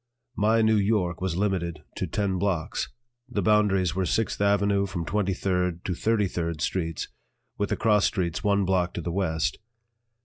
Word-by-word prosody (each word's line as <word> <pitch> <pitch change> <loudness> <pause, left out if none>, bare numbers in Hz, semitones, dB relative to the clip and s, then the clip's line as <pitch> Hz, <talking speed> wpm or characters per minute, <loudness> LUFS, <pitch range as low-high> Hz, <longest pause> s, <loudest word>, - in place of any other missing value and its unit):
My 110 +2 +3
New 110 0 +4
York 100 -4 +1
was 95 -3 -1
limited 85 -6 -1
to - - -2
ten 100 -3 -1
blocks; 90 -5 -1 0.4
the 120 - -1
boundaries 100 -5 +3
were 95 0 -1
Sixth 115 -2 0
Avenue 100 0 +2
from 85 -3 -4
Twenty 95 +1 0
third 90 -2 -1
to 90 - -1
Thirty 110 +3 +1
third 85 -3 -3
Streets, 85 +2 -2 0.5
with 100 - 0
the - - 0
cross 105 -3 +3
streets 85 -4 -1
one 100 -1 +2
block 90 -2 +1
to 85 - -3
the 85 - -3
west. 80 -4 -1
95 Hz, 170 wpm, -26 LUFS, 85-100 Hz, 0.5 s, New